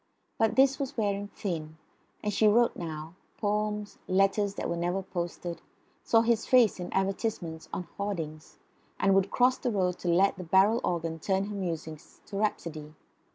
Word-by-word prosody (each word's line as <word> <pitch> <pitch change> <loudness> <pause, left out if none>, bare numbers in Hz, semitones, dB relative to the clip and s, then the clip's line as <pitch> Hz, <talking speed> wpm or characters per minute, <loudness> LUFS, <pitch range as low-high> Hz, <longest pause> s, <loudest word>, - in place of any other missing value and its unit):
But 225 -1 +2
this 270 0 +4
was 270 -3 -4
wearing 205 -2 0
thin. 160 -6 -5 0.5
And 210 - -1
she 215 +2 +4
wrote 235 +3 +4
now 160 -1 -6 0.2
poems, 210 0 -2
letters 195 +2 +2
that - - -3
were 170 - -1
never 175 +3 -1
posted, 175 -2 -5 0.4
saw 225 - +4
his 230 -1 +1
face 245 -6 +5
in 180 - -5
advertisements 190 -4 -2
on - - -3 0.2
hoardings, 165 -7 -4 0.4
and 195 - +4
would 195 0 +3
cross 250 +1 +3
the 250 - -1
road 185 -5 0
to - - -5
let 190 +4 +3
the 185 - -6
barrel 195 +7 +4
organ 165 -2 -2
turn 190 +3 0
her 205 0 -5
musings 165 -4 -5
to 200 - -6
rhapsody. 160 -7 -3
195 Hz, 165 wpm, -29 LUFS, 170-210 Hz, 0.5 s, face